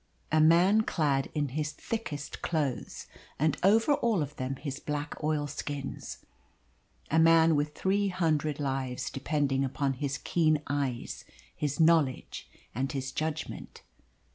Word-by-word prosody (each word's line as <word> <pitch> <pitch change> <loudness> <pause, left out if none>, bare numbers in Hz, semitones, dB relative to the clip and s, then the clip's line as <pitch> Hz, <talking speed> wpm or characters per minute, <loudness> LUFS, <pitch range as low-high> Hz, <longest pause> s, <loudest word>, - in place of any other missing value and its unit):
A 155 0 +4
man 175 +7 +5
clad 145 -9 0
in 145 -2 0
his 150 +3 -3
thickest 155 -11 -5
clothes, 145 -7 -2 0.3
and 155 0 +2
over 225 - +4
all 230 - +1
of 145 +1 -8
them 130 +1 -3
his 135 0 -5
black 150 +1 -4
oilskins. 145 -2 -3 0.9
A 160 - +4
man 165 0 +6
with 150 +1 -1
three 200 +1 +1
hundred 155 -5 0
lives 135 -3 -2
depending 135 -1 0
upon 135 +1 -1
his 135 0 -3
keen 155 -3 +1
eyes, 140 -4 -3 0.3
his 145 0 -2
knowledge, 160 -5 +2 0.2
and 135 +4 -2
his 135 -2 -3
judgment. 155 +2 -4
150 Hz, 130 wpm, -29 LUFS, 135-160 Hz, 0.9 s, man